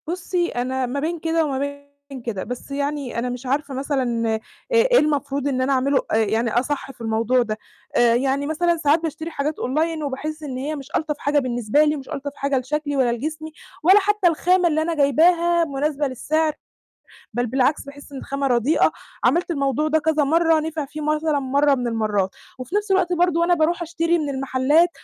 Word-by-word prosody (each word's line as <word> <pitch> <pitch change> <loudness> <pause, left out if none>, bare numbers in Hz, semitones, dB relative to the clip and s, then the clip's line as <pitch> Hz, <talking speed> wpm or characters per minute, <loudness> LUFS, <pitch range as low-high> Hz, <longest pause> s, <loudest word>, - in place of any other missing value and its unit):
بُصي، 350 0 -1
أنا 255 0 -2
ما 255 +3 -3
بين 330 +3 -2
كده 325 0 +1
وما 270 -3 -2
بين 285 -1 -7
كده، 220 -5 -4
بس 250 +3 -7
يعني 280 -3 -2
أنا 250 +1 -2
مش 245 +1 -6
عارفة 280 +2 -1
مثلًا 250 -5 -1
إ - - -3 0.3
إيه - - +5
المفروض 285 -2 0
إن 260 -2 0
أنا 270 +2 +1
أعملُه، 270 +1 +2
آآ، - - +2
يعني 225 +1 +1
أصح 275 +4 -1
في 250 - -18
الموضوع 230 +3 +1
ده، 215 -2 -2 0.4
آآ - - +3
إيه 240 +3 +1
يعني 275 +1 0
مثلًا 340 +2 +1
ساعات 300 0 +3
باشتري 320 +1 -4
حاجات 300 0 -2
Online 315 +4 -1
وباحِس 305 +3 -4
إن 265 -4 -5
هي 290 +4 -3
مش 275 -1 -9
ألطف 305 -1 -1
حاجة 290 0 +1
بالنسبة 245 +1 +1
لي، 300 0 +2
ومش 275 -3 -9
ألطف 285 +1 -4
حاجة 280 -1 0
لشكلي 290 +3 -2
ولا 255 -3 +2
لجسمي، 310 +6 -4 0.3
ولا 380 +5 +7
حتى 415 -1 +2
الخامة 355 +2 +3
اللي 315 -1 +1
أنا 330 +1 -1
جايباها 335 +4 +3
مُناسبة 290 0 -1
للسِعر، 310 +4 0 0.8
بل 245 +2 0
بالعكس 265 +5 +1
باحِس 285 +1 -12
إن 275 - -7
الخامة 275 +1 -2
رديئة، 245 +4 +3 0.3
عملت 340 +8 +2
الموضوع 280 -1 0
ده 315 +1 +2
كذا 310 0 +1
مَرّة، 325 +2 +3
نفِع 310 -1 -3
فيه 295 +2 -8
مثلًا 305 0 0
مَرّة 280 +1 +2
من 245 -2 -2
المَرّات. 215 -4 0 0.3
وفي 255 +9 -5
نَفس 415 -1 0
الوقت 370 -2 +2
برضه 350 -1 +2
وأنا 345 +1 +3
باروح 340 +1 +1
أشتري 335 0 0
من 295 -2 -2
المحلات 270 +5 +2
285 Hz, 195 wpm, -22 LUFS, 260-320 Hz, 0.8 s, ولا